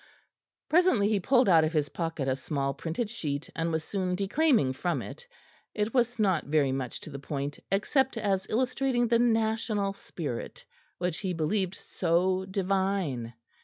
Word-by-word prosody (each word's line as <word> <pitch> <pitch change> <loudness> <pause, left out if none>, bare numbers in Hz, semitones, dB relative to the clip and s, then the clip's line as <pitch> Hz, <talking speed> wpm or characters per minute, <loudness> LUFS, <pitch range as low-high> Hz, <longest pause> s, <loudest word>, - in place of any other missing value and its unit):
Presently 315 - +4
he 210 -2 +2
pulled 250 +4 +3
out 165 -4 +6
of 155 +1 0
his 150 -2 +1
pocket 165 -5 -3
a 130 - +2
small 135 0 -2
printed 170 - -3
sheet, 150 -10 -4
and 165 0 -1
was 160 -1 -1
soon 185 0 -2
declaiming 205 - +2
from 175 +6 -1
it. 485 - -8 0.5
It 210 +1 -1
was 245 -2 +2
not 190 -7 +2
very 145 -2 +2
much 130 -2 -3
to 155 - -9
the 140 - -6
point, 140 +1 -4
except 260 +6 +1
as 195 -3 0
illustrating 250 0 +1
the 235 0 +4
national 220 -3 +1
spirit 155 -10 -6 0.3
which 180 -2 -2
he 190 -3 -2
believed 180 +3 0
so 185 +2 0
divine. 190 - -1
190 Hz, 160 wpm, -29 LUFS, 155-220 Hz, 0.5 s, out